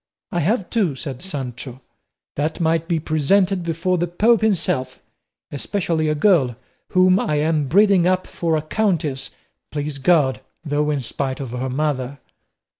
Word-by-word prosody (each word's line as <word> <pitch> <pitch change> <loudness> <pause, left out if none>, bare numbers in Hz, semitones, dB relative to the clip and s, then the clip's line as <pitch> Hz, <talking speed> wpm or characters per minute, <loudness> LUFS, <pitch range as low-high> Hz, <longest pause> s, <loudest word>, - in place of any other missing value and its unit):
"I 175 - 0
have 195 +4 0
two," 195 - +1
said 135 -2 -6
Sancho, 130 -7 -5 0.6
"that 150 +2 -2
might 165 0 +1
be 170 -2 +1
presented 180 +5 +2
before 170 +2 -1
the 175 - 0
Pope 215 +7 +3
himself, 140 -11 0 0.5
especially 160 +1 -1
a 150 - +1
girl 150 - +3 0.4
whom 185 +1 +5
I 150 - 0
am 150 -1 +1
breeding 195 +2 +4
up 185 0 +1
for 165 -2 -1
a 155 - -3
countess, 155 -7 -1 0.4
please 145 -1 -4
God, 140 -3 +3 0.2
though 150 0 0
in 145 -2 0
spite 130 +3 -3
of 135 -4 -5
her 125 +1 -3
mother." 140 -1 -2
155 Hz, 150 wpm, -21 LUFS, 140-180 Hz, 0.6 s, whom